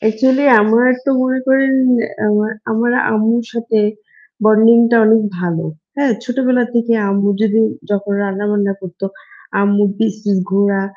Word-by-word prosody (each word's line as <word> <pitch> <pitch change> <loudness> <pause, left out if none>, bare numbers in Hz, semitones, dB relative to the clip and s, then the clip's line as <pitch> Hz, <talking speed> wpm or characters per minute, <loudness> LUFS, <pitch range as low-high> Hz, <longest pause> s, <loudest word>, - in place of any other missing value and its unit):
Actually 260 +6 +1 0.2
আমার 225 +3 +3 0.2
তো 275 - 0
মনে 255 0 -1
করেন 265 0 +2 0.5
আ - - +1 0.4
আমার 235 +2 0 0.2
আম্মুর 225 +2 0
সাথে 230 -1 -1 0.7
বন্ডিংটা 230 +2 +4
অনেক 220 0 +4 0.2
ভালো। 175 -1 -3 0.3
হ্যাঁ? 280 -3 +1
ছোটবেলা 250 0 0
থেকে 235 0 +1 0.2
আম্মু 200 0 0
যদি 220 0 +1 0.3
যখন 200 0 -2
রান্না-বান্না 200 0 -1
করত, 180 -1 -11 0.6
আম্মুর 205 0 +2
পিস, 220 -3 0
পিস 200 -2 +1
ঘোরা, 200 0 +1
220 Hz, 130 wpm, -15 LUFS, 200-240 Hz, 0.7 s, বন্ডিংটা